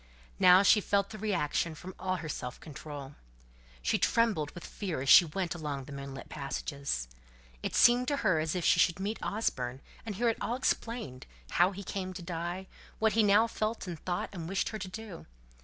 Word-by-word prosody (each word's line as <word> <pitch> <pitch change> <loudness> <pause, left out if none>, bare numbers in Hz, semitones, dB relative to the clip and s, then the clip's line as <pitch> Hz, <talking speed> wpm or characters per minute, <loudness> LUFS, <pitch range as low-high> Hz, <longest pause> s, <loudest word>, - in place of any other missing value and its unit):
Now 180 +2 +8
she 210 +1 +6
felt 200 0 +1
the 215 - -8
reaction 170 -5 0
from 185 +3 -9
all 185 0 -1
her 160 -3 -5
self 125 -4 -5
control. 145 -2 -8 0.7
She - - +1
trembled 215 -11 +2
with 175 - -8
fear 185 -9 -4
as 135 - -2
she 175 - +10
went 170 +2 -2
along 150 -5 -4
the 145 - -11
moonlit 140 -1 -7
passages. 140 - -3 0.5
It - - -3
seemed 245 +1 +5
to 285 - +1
her 170 -4 +4
as 155 +2 -1
if 180 - -1
she - - +5
should 170 +1 +3
meet 205 +3 -3
Osborne, 130 - -2 0.2
and 215 -3 -5
hear 235 +5 +1
it 225 - -2
all 235 - -1
explained; 230 - -2 0.2
how 175 +2 +4
he 200 +1 -7
came 185 -1 -4
to 180 - -7
die, 175 +2 -4 0.3
what 220 0 +2
he 225 - +4
now 210 +1 +5
felt 220 -1 -2
and 175 -4 -6
thought 175 +2 -3
and 165 -3 -6
wished 195 0 0
her 215 - -5
to 200 - -5
do. 200 -2 -8
180 Hz, 200 wpm, -31 LUFS, 150-210 Hz, 0.7 s, she